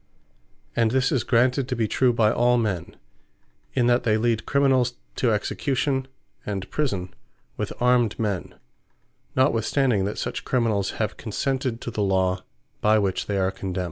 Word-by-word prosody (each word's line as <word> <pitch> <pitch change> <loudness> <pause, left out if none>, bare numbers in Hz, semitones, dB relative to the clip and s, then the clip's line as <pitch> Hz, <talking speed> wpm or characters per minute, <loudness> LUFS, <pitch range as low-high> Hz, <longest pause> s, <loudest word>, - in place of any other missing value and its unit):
And 115 -1 +3
this 130 +4 +1
is 130 -7 +1
granted 125 +2 +2
to 130 - -2
be 115 -2 0
true 125 +3 +3
by 110 -2 +3
all 125 0 +3
men, 100 -8 -2 0.8
in 125 -2 +3
that 120 +1 +3
they 110 -2 +2
lead 115 -1 0
Criminals 130 -3 +2 0.2
to 120 - +2
Execution, 130 +5 -1 0.4
and 95 -2 -4
Prison, 100 -12 -2 0.4
with - - -3
armed 125 -3 +3
men, 100 -6 -2 0.8
notwithstanding 120 -3 +2
that 100 - -3
such - - -3
Criminals 110 -6 0
have 110 - -2
consented 130 +1 -2
to 120 - -5
the 110 - -2
Law, 95 -1 +1 0.4
by 110 +1 +4
which 100 -3 0
they 100 - -1
are 95 0 +1
condemned. 95 -1 -4
115 Hz, 155 wpm, -24 LUFS, 100-125 Hz, 0.8 s, by